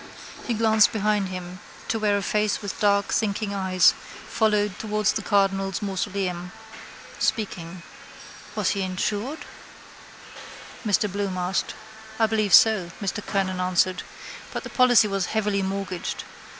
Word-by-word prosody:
He 240 Hz, -, 0 dB
glanced 220 Hz, -1 st, +4 dB
behind 210 Hz, -2 st, 0 dB
him 180 Hz, 0 st, -7 dB, 0.3 s
to 225 Hz, -, 0 dB
where 205 Hz, -1 st, +2 dB
a 200 Hz, -, -3 dB
face 210 Hz, 0 st, 0 dB
with 205 Hz, -2 st, -6 dB
dark 200 Hz, -2 st, +2 dB
thinking 205 Hz, -1 st, -1 dB
eyes 190 Hz, -2 st, +4 dB, 0.3 s
followed 210 Hz, -3 st, +1 dB
towards 215 Hz, -1 st, 0 dB
the 220 Hz, -, -2 dB
cardinal's 195 Hz, -2 st, +1 dB
mausoleum. 185 Hz, -2 st, -3 dB, 0.7 s
Speaking. 180 Hz, -5 st, -2 dB, 0.7 s
—Was -, -, +1 dB
he 200 Hz, -, -2 dB
insured? 205 Hz, +9 st, -3 dB, 1.4 s
Mr 210 Hz, -1 st, +2 dB
Bloom 200 Hz, -1 st, -2 dB
asked. 180 Hz, +1 st, -1 dB, 0.4 s
—I 225 Hz, -, +5 dB
believe 215 Hz, -2 st, +4 dB
so, 220 Hz, -8 st, +5 dB
Mr 200 Hz, +1 st, -3 dB
Kernan 185 Hz, -2 st, -1 dB
answered. 185 Hz, 0 st, +1 dB, 0.5 s
But -, -, -4 dB
the -, -, -8 dB
policy 245 Hz, -4 st, +5 dB
was 195 Hz, -2 st, -1 dB
heavily 205 Hz, -2 st, +1 dB
mortgaged. 190 Hz, -2 st, -4 dB
200 Hz, 130 wpm, -24 LUFS, 185-215 Hz, 1.4 s, I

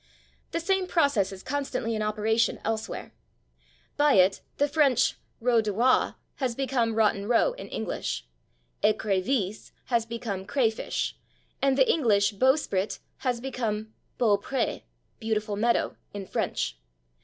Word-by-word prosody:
The 335 Hz, -, -2 dB
same 380 Hz, +2 st, +1 dB
process 280 Hz, -, +2 dB
is 190 Hz, -1 st, -9 dB
constantly 270 Hz, -4 st, -2 dB
in 215 Hz, -, -1 dB
operation 215 Hz, +2 st, +1 dB
elsewhere. 220 Hz, -1 st, -3 dB, 0.8 s
By 295 Hz, 0 st, +5 dB
it 190 Hz, 0 st, +4 dB, 0.2 s
the 285 Hz, -, +3 dB
French 275 Hz, -4 st, +3 dB, 0.2 s
/route 235 Hz, -1 st, +3 dB
de 215 Hz, -1 st, -2 dB
roi/ 240 Hz, +6 st, +3 dB, 0.2 s
has 255 Hz, -4 st, -1 dB
become 250 Hz, -4 st, 0 dB
/Rotten 205 Hz, -2 st, +2 dB
Row/ 245 Hz, -, +4 dB
in -, -, -9 dB
English, 60 Hz, -, -3 dB, 0.6 s
/écrevisse/ 210 Hz, 0 st, 0 dB
has 235 Hz, -2 st, +1 dB
become 215 Hz, -5 st, -4 dB
/crayfish/, 230 Hz, -5 st, 0 dB, 0.5 s
and 270 Hz, -1 st, +3 dB
the 265 Hz, -, +5 dB
English 210 Hz, -9 st, +3 dB
/bowsprit/ 220 Hz, -4 st, +1 dB, 0.2 s
has 250 Hz, -3 st, -1 dB
become 220 Hz, -4 st, -3 dB, 0.3 s
/beau 205 Hz, -4 st, +3 dB
pré/ 265 Hz, +1 st, -1 dB, 0.4 s
(=/beautiful 215 Hz, -2 st, -1 dB
meadow/) 235 Hz, +3 st, +1 dB, 0.2 s
in 200 Hz, -1 st, -5 dB
French. 60 Hz, -, -2 dB
230 Hz, 130 wpm, -27 LUFS, 210-265 Hz, 0.8 s, By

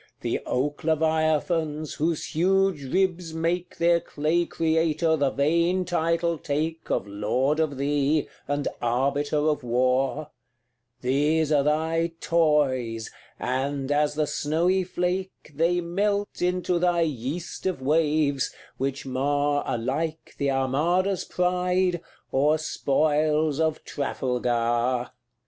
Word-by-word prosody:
The -, -, -1 dB
oak 145 Hz, +3 st, -1 dB
leviathans, 155 Hz, 0 st, +1 dB
whose 160 Hz, +1 st, -2 dB
huge 180 Hz, -5 st, +1 dB
ribs 180 Hz, -3 st, 0 dB
make 170 Hz, +2 st, -2 dB
Their 170 Hz, 0 st, +4 dB
clay 165 Hz, +3 st, 0 dB
creator 160 Hz, 0 st, +1 dB
the 140 Hz, -3 st, +1 dB
vain 170 Hz, +7 st, +1 dB
title 170 Hz, -1 st, 0 dB
take 155 Hz, +3 st, -3 dB
Of -, -, 0 dB
lord 110 Hz, +9 st, 0 dB
of 150 Hz, -4 st, 0 dB
thee, 145 Hz, +2 st, +1 dB, 0.2 s
and 145 Hz, 0 st, -1 dB
arbiter 140 Hz, +5 st, 0 dB
of 150 Hz, -1 st, +1 dB
war; 130 Hz, +4 st, 0 dB, 0.7 s
These 150 Hz, +4 st, +1 dB
are 145 Hz, -2 st, +4 dB
thy 160 Hz, +3 st, 0 dB
toys, 135 Hz, -9 st, +1 dB, 0.3 s
and, 135 Hz, +2 st, -2 dB
as 150 Hz, 0 st, +2 dB
the 155 Hz, 0 st, +1 dB
snowy 170 Hz, +6 st, +1 dB
flake, 180 Hz, -1 st, -3 dB
They 170 Hz, +4 st, +1 dB
melt 200 Hz, +4 st, -1 dB
into 180 Hz, 0 st, +1 dB
thy 175 Hz, -1 st, +2 dB
yeast 155 Hz, +5 st, -3 dB
of 185 Hz, -7 st, -1 dB
waves, 150 Hz, -1 st, +1 dB, 0.3 s
which 135 Hz, +1 st, -3 dB
mar 145 Hz, +2 st, 0 dB
Alike 150 Hz, +7 st, -2 dB
the 140 Hz, -, +1 dB
Armada's 160 Hz, +9 st, +1 dB
pride, 180 Hz, 0 st, +1 dB, 0.3 s
or 150 Hz, +4 st, +3 dB
spoils 155 Hz, 0 st, +1 dB
of 160 Hz, -1 st, 0 dB
Trafalgar. 125 Hz, -2 st, -1 dB
155 Hz, 115 wpm, -25 LUFS, 140-170 Hz, 0.7 s, Their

